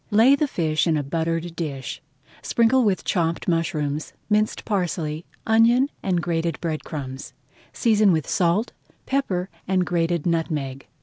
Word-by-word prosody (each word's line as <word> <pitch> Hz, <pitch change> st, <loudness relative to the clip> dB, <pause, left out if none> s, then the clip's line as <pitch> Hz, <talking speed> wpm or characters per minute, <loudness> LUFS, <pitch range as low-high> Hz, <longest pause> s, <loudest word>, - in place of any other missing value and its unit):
Lay 225 Hz, +5 st, +6 dB
the 295 Hz, +1 st, 0 dB
fish 160 Hz, -, 0 dB
in 160 Hz, -2 st, +2 dB
a 145 Hz, -, -1 dB
buttered 165 Hz, +3 st, -2 dB
dish, 140 Hz, -7 st, -5 dB, 0.4 s
sprinkle 240 Hz, +2 st, +3 dB
with 200 Hz, -4 st, +1 dB
chopped 170 Hz, -3 st, -1 dB
mushrooms, 155 Hz, -3 st, -1 dB, 0.2 s
minced 215 Hz, +1 st, +1 dB
parsley, 170 Hz, -6 st, -2 dB, 0.2 s
onion, 235 Hz, +5 st, +4 dB
and 180 Hz, -3 st, 0 dB
grated 165 Hz, -4 st, -1 dB
bread 160 Hz, -3 st, -3 dB
crumbs, 135 Hz, -3 st, -6 dB, 0.4 s
season 215 Hz, -4 st, +3 dB
with 160 Hz, -4 st, 0 dB
salt, 180 Hz, +6 st, +1 dB, 0.3 s
pepper, 195 Hz, -10 st, -1 dB, 0.2 s
and 185 Hz, -1 st, +2 dB
grated 170 Hz, -2 st, 0 dB
nutmeg. 155 Hz, -6 st, -2 dB
170 Hz, 135 wpm, -23 LUFS, 155-210 Hz, 0.4 s, Lay